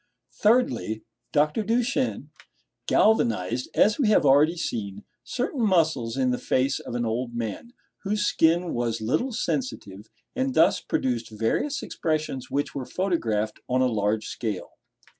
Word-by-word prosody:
Thirdly 220 - +1 0.3
Dr. 150 +7 +2
Duchenne 240 - -1 0.6
galvanized, 120 - +2
as 210 +5 +4
we 260 - +3
have 210 -7 +4
already 145 +5 +5
seen, 100 -9 -4 0.2
certain 255 +1 -3
muscles 160 - +2
in 130 -1 +2
the 125 - -1
face 130 +1 +1
of - - -7
an 120 -1 -1
old 120 +2 -2
man, 115 - -5 0.3
whose 205 +1 -1
skin 170 0 +2
was 120 -1 -1
little 155 - 0
sensitive, 110 - -4 0.3
and 260 0 -1
thus 165 +4 +4
produced 120 -3 -1
various 115 - -1
expressions 155 -5 -2
which 145 +1 -2
were 135 -3 -5
photographed 115 - -1
on 130 +1 +2
a - - +4
large 110 -2 0
scale. 110 -6 -4
140 Hz, 140 wpm, -25 LUFS, -, 0.6 s, already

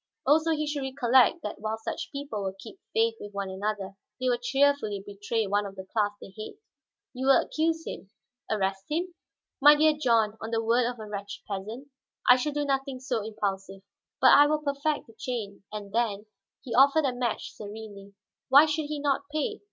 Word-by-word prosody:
Also 310 +4 +4
he 305 0 -1
should 295 -1 -3
recollect 265 +3 +3
that 210 - -5
while 220 +1 -2
such 330 +9 -5
people 280 -7 -5
will 190 -1 -3
keep 195 - -12
faith 455 0 +2
with 205 0 -9
one 200 -1 -3
another, 195 0 -4 0.2
they 255 - -1
will 240 -1 +1
cheerfully 270 -6 +1
betray 205 +2 -2
one 205 +1 +1
of 195 -1 -7
the 190 -1 -8
class 210 -3 +2
they 190 - -12
hate." 215 - -8 0.6
"You 260 +1 -3
will 270 -2 +7
accuse 325 +1 -1
him, 195 - -7 0.4
arrest 195 -2 -1
him?" 345 +4 -2 0.5
"My 295 +2 +9
dear 310 +1 +4
John, 225 -7 +2
on 220 - -5
the 225 0 0
word 235 +2 +3
of 245 - -6
a 215 - -6
wretched 205 -1 -7
peasant? 215 +8 -6 0.4
I 250 - +9
shall 295 +4 -1
do 290 0 -1
nothing 270 -1 -1
so 250 -4 -2
impulsive. 195 -3 -4 0.4
But, - - +7
I 290 0 +8
will 305 0 0
perfect 285 +1 -1
the 225 - -17
chain, 215 -5 -5
and 205 -2 -7
then 220 -3 0 0.2
" - - -54
He 250 -4 -5
offered 280 +4 +5
a 260 - +1
match 245 -2 -3
serenely. 205 -1 -10 0.3
"Why 280 +4 +8
should 310 0 -1
he 300 +1 -4
not 285 0 -1
pay? 360 +8 -2
240 Hz, 200 wpm, -27 LUFS, 205-285 Hz, 0.6 s, My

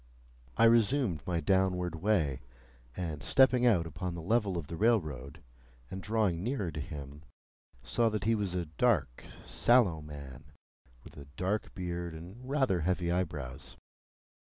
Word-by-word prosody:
I - - +4
resumed 115 - +3
my 85 -2 0
downward 90 0 +1
way, 85 -6 0 0.6
and 80 -5 -4
stepping 130 - +4
out 90 -8 +3
upon 85 +3 -5
the 85 - -6
level 100 -1 +1
of 85 - -4
the 85 - -6
railroad, 80 - 0 0.5
and 95 - -5
drawing 105 -6 0
nearer 105 -5 -2
to 75 - -6
him, 75 -1 -7 0.6
saw 115 -1 +1
that 105 -1 -3
he 115 - +2
was 100 -5 -1
a 90 -1 -1
dark, 80 - 0 0.2
sallow 110 -10 +3
man, 70 -1 -10 0.5
with - - -14
a 70 - -9
dark 100 +4 -2
beard 85 -3 -4
and 95 +11 -10
rather 135 -10 +2
heavy 90 +1 0
eyebrows. 70 -7 -4
90 Hz, 145 wpm, -31 LUFS, 75-110 Hz, 0.6 s, I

